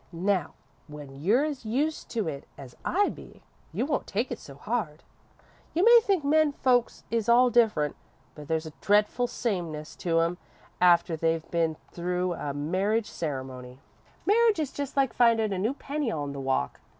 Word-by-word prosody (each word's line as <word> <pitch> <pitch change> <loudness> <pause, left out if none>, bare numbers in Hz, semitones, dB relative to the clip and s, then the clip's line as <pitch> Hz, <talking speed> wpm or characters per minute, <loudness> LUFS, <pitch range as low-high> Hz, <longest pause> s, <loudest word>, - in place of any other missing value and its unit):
Now, 185 0 -1 0.3
when 150 -2 -10
you're 230 - +3
as 290 -4 -4
used 280 +8 -1
to 220 -6 -2
it 140 -3 -5
as 130 -3 -11
I 405 +3 +2
be, - - -12 0.3
you - - -1
won't 290 -1 -2
take 225 +6 -2
it - - -4
so 140 - -12
hard. 170 - -3 0.7
You 345 - +3
may 475 0 +9
think 390 -7 +1
men 300 +1 +3
folks 245 -3 +1
is 230 -1 0
all 245 +1 +6
different, 215 -12 +2 0.4
but 150 -1 -11
there's 160 0 -1
a 160 - -7
dretful 210 +4 +2
sameness 170 -11 -3
to 165 -2 +1
'em 170 +2 -1 0.4
after 175 -2 +4
they've 165 0 -1
been 165 -2 0
through 180 +1 -1
a 145 -3 -4
marriage 190 +10 -1
ceremony. 130 -4 -5 0.5
Marriage 450 +1 +4
is 295 -4 -2
just 285 -1 -5
like 270 -2 +2
findin' 225 -3 +3
a 185 - -2
new 225 +8 0
penny 290 -2 -3
on 145 -8 -3
the 140 - -6
walk. 130 - -1
195 Hz, 175 wpm, -27 LUFS, 155-250 Hz, 0.7 s, may